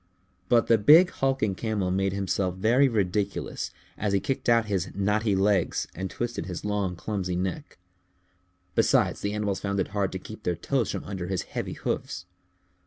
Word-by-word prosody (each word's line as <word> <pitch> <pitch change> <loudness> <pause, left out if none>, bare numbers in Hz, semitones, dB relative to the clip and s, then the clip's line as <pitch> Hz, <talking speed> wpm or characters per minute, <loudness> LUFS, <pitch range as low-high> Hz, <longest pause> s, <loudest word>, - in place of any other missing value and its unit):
But 120 -2 +5
the 115 -1 +4
big 160 - +7
hulking 135 -7 0
Camel 100 -2 -1
made 95 +1 +1
himself 95 -1 -1
very 120 +8 +4
ridiculous 100 -3 -1 0.3
as 105 -1 0
he 100 - +3
kicked 130 +5 -2
out 115 -1 +4
his 95 -3 -1
knotty 105 +1 +1
legs 95 -2 +1
and 95 +2 -4
twisted 120 -7 -4
his 90 0 -5
long 100 -3 -1
clumsy 90 -1 -3
neck. 95 - -4 1.0
Besides, - - +2
the 100 0 -1
animals 105 -2 -1
found 100 0 -2
it 95 - 0
hard 100 -2 -1
to - - -2
keep 110 +3 -10
their 90 -5 -1
toes 120 +7 -1
from - - -3
under 95 -3 -5
his 95 -1 -1
heavy - - -5
hoofs. - - -3
100 Hz, 175 wpm, -27 LUFS, 95-110 Hz, 1.0 s, big